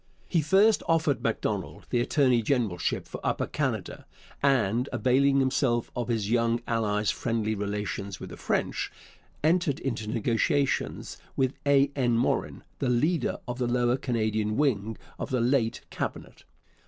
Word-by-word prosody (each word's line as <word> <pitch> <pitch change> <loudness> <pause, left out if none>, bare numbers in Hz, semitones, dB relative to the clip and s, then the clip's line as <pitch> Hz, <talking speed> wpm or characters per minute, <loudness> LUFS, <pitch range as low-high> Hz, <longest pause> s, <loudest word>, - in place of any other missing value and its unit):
He 170 - +2
first 195 +7 +4
offered 160 -4 +2
Macdonald - - -2
the 120 - +2
attorney 125 -1 +3
generalship 110 -8 0
for - - -8
Upper - - 0
Canada, - - -3 0.3
and, 125 -2 +2
availing 135 +2 +3
himself 130 -3 +1
of 120 -2 -2
his 110 -3 -1
young 115 0 +2
ally's 105 -2 +1
'friendly 115 -2 -1
relations 100 -2 -3
with - - -8
the - - -7
French,' - - -1 0.5
entered 165 -2 +2
into 115 -5 -3
negotiations 120 +5 0 0.2
with 130 0 +1
A. 140 0 +4
N. 120 -4 +2
Morin, 120 - 0 0.2
the 130 - 0
leader 155 +8 +1
of 120 +1 -4
the 125 - +1
Lower 120 0 +2
Canadian 110 -4 -1
wing 110 -7 +1 0.2
of - - -4
the 130 -2 0
late 120 -1 +1
Cabinet. - - -5
120 Hz, 140 wpm, -27 LUFS, 110-140 Hz, 0.5 s, first